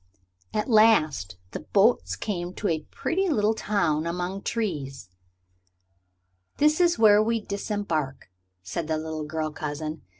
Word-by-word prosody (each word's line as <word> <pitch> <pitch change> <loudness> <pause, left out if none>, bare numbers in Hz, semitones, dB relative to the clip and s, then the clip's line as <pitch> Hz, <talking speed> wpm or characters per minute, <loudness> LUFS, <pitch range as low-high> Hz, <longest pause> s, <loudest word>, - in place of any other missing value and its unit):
At 210 - -1
last 155 - +3
the - - -5
boats 95 +2 +2
came 175 - -4
to 210 - -2
a 155 -3 -1
pretty 380 +3 -1
little 215 -7 +2
town 170 -8 0
among 180 +3 -3
trees. 145 - -3 1.5
"This 305 +3 +3
is 345 -1 +3
where 210 -2 +6
we 230 +1 +1
disembark," 200 - -3 0.3
said 150 - -4
the 160 0 0
little 155 -1 -4
girl 155 0 -3
cousin. 155 +1 -5
175 Hz, 130 wpm, -26 LUFS, 155-215 Hz, 1.5 s, where